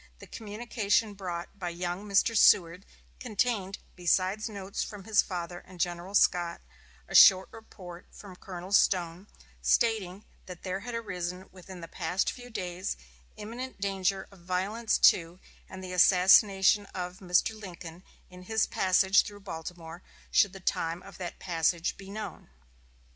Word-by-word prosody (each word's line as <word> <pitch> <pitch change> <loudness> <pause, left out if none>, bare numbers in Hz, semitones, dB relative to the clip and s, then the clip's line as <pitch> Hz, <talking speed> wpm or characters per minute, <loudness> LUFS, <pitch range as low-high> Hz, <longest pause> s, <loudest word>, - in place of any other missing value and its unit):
The - - -12
communication 215 -1 -2
brought 180 -1 -7
by 180 -2 -3
young 175 +4 -5
Mr. 205 +3 +2
Seward 180 -3 +4 0.3
contained 215 -5 -1 0.2
besides 185 +4 0
notes 200 -2 -5
from 205 -2 -9
his 215 0 +3
father 175 -1 -6
and 185 0 -16
General 175 +3 -3
Scott, 175 -3 +2 0.5
a - - -10
short 190 -2 +8
report 180 -6 -12
from 195 -3 -12
Colonel 180 0 -9
Stone, 180 -1 +2 0.3
stating 200 - +1 0.2
that 180 -2 -10
there 190 0 -3
had 235 +3 -6
arisen 180 -4 -5
within 185 -1 -12
the 165 - -8
past 185 +3 -1
few 245 -1 -11
days 185 -4 -4 0.4
imminent 240 +4 -7
danger 195 -1 -1
of 195 - -17
violence 190 +6 -1
to 170 +1 +4 0.3
and 190 0 -9
the 185 0 -6
assassination 190 +2 +5
of 180 0 -5
Mr. 180 +3 +1
Lincoln 175 -4 -10 0.3
in 180 0 -14
his 220 +1 +1
passage 190 +1 +3
through 205 0 -10
Baltimore, 165 -1 -8 0.3
should 200 -3 +4
the 195 - -9
time 170 -1 -2
of 195 - -13
that 175 -2 -6
passage 170 -1 -1
be 195 -1 -12
known. 205 - -8
190 Hz, 145 wpm, -29 LUFS, 175-205 Hz, 0.5 s, short